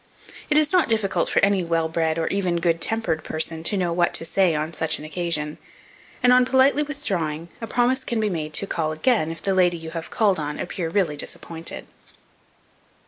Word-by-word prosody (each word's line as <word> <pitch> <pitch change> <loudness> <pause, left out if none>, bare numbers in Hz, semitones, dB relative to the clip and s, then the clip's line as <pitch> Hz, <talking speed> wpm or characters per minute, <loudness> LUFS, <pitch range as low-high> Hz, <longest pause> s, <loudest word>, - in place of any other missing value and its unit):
It 300 - +3
is 305 -1 +3
not 365 -7 +3
difficult 215 -4 +1
for - - +2
any 200 -2 +1
well 165 -1 0
bred 160 0 0
or 165 - 0
even 185 -3 0
good 170 0 +1
tempered 205 -8 0
person, 160 +1 -1
to 205 - +1
know 175 -2 0
what 175 0 +1
to - - +1
say 175 0 +2
on 155 +2 -2
such 160 0 0
an 150 - -9
occasion, 155 -2 -2 0.6
and, 250 0 +6
on 250 0 +6
politely 265 +3 +3
withdrawing, 180 - -3
a 225 - -4
promise 250 +3 +1
can 235 -3 -2
be 215 - +1
made 155 -5 -3
to - - +2
call 160 -5 -2
again, 160 0 +1
if 165 -1 -7
the 195 - +1
lady 180 -2 +3
you 160 -1 -8
have 165 -1 -6
called 200 -6 +2
on, 150 0 -4
appear 170 -3 -4
really 170 -4 +1
disappointed. 165 +3 -5
175 Hz, 200 wpm, -23 LUFS, 160-220 Hz, 0.6 s, and